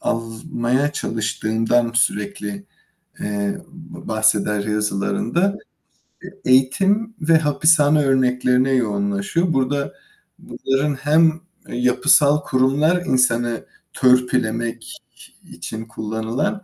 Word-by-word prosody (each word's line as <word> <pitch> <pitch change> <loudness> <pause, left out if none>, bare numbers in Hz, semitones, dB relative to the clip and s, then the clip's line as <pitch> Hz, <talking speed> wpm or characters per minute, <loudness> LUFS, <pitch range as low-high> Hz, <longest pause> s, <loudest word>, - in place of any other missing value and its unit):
almaya 120 +4 -2
çalıştığından 115 +1 -1
sürekli, 105 -3 -2 0.6
eee, 100 -1 -2
b 175 -2 -12
bahseder 105 -2 +1
yazılarında. 110 - -1 0.9
Eğitim 195 - +2
ve 160 +1 +4
hapishane 150 0 +3
örneklerine 130 0 +2
yoğunlaşıyor. 105 - 0
Burada 140 +1 -1 0.5
bunların 135 +2 -2
hem, 160 +3 +2 0.3
eee, - - -6
yapısal 130 +4 +3
kurumlar 145 +7 +1
insanı 120 -3 +1 0.3
törpülemek 120 -2 0 0.6
için 85 +7 -7
kullanılan, 115 - -3
125 Hz, 80 wpm, -20 LUFS, 110-150 Hz, 0.9 s, ve